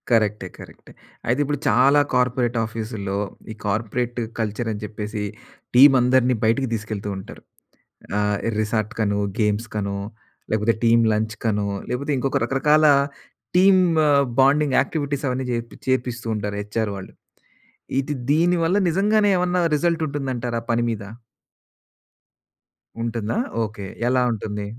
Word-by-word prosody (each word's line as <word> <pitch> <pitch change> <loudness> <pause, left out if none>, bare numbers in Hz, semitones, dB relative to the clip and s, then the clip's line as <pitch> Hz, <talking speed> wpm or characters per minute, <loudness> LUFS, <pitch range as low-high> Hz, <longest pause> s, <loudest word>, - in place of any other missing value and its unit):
కరెక్టే, 105 -4 +1
కరెక్టే. - - -13 0.4
అయితే 125 +4 +1
ఇప్పుడు 145 0 -2
చాలా 140 +3 +5
కార్పొరేట్ 125 -1 +1
ఆఫీసుల్లో, 110 -3 -4 0.3
ఈ - - -5
కార్పొరేట్ 120 +4 -2 0.2
కల్చరని 110 0 -2
చెప్పేసి 105 0 -5 0.5
టీమ్ 135 +2 +9
అందరిని 125 0 +3
బయటికి 115 +5 +2
దీసుకెళ్తూ 110 -2 -4
ఉంటారు. 95 - -10 0.8
ఆహ్, 105 0 +1 0.2
రిసార్ట్‌కనో, 110 -1 -1 0.2
గేమ్స్‌కనో 105 -1 -1 0.5
లేకపోతే 110 +1 +2
టీమ్ 115 0 +5
లంచ్‌కనో 110 -1 -1 0.2
లేపోతే 140 +4 -2
ఇంకొక 135 +1 0
రకరకాల 150 +5 +3 0.7
టీమ్ 185 +1 +6 0.6
బాండింగ్ 140 +1 +4
యాక్టివిటీస్ 145 -3 -2
అవన్నీ 130 +1 -2
జేపిచ్చి 115 -1 -5
చేపిస్తూ 120 -2 -3
ఉంటారు. 105 -1 -3
హెచ్ఆర్ 105 +1 -2
వాళ్ళు. 95 -1 -9 0.9
ఇది 135 +2 -2 0.2
దీనివల్ల 170 +3 +2
నిజంగానే 205 +4 +3
ఏవన్నా 180 0 +1 0.2
రిజల్ట్ 170 +2 0
ఉంటుందంటారా 130 -5 -3
పని 120 0 +1
మీద? 110 -2 -3 2.0
ఉంటుందా? 115 - -2 0.3
ఓకే. 105 -2 -6 0.2
ఎలా 130 0 +3
ఉంటుంది? 105 -2 -4
115 Hz, 110 wpm, -22 LUFS, 105-135 Hz, 2.0 s, టీమ్